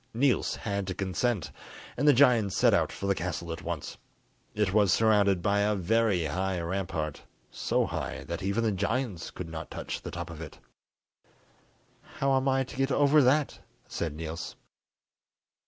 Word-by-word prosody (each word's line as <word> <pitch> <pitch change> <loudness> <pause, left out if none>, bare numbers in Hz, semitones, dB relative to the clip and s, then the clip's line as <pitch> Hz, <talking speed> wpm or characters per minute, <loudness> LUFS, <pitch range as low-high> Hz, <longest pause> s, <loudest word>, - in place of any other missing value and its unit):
Niels 130 +1 +2
had 100 -3 -3
to 95 - -3
consent, 100 +1 -1 0.4
and 145 +4 0
the - - +9
giants 120 -7 +4
set - - +5
out - - +2
for - - -6
the 100 - +3
castle 85 -1 -4
at 80 - -8
once. - - -5 0.6
It 105 -3 +1
was 105 -3 +4
surrounded 100 -4 +3
by 100 0 +2
a 105 +1 +2
very 100 -2 +1
high 90 +4 -1
rampart, 85 -4 -3 0.3
so - - 0
high - - -4
that - - -5
even 100 +4 0
the 110 - +2
giants 105 -1 -2
could 90 - -7
not 80 -1 -7
touch - - -5
the - - -6
top 85 -1 -6
of 80 -1 -9
it. 75 -3 -9 1.6
"How 135 0 +2
am 130 +1 +1
I 135 0 +2
to 130 - -10
get 135 0 +1
over 145 +2 +5
that?" 140 +3 +2 0.3
said 80 -3 -3
Niels. 80 +2 -6
100 Hz, 170 wpm, -29 LUFS, 85-120 Hz, 1.6 s, the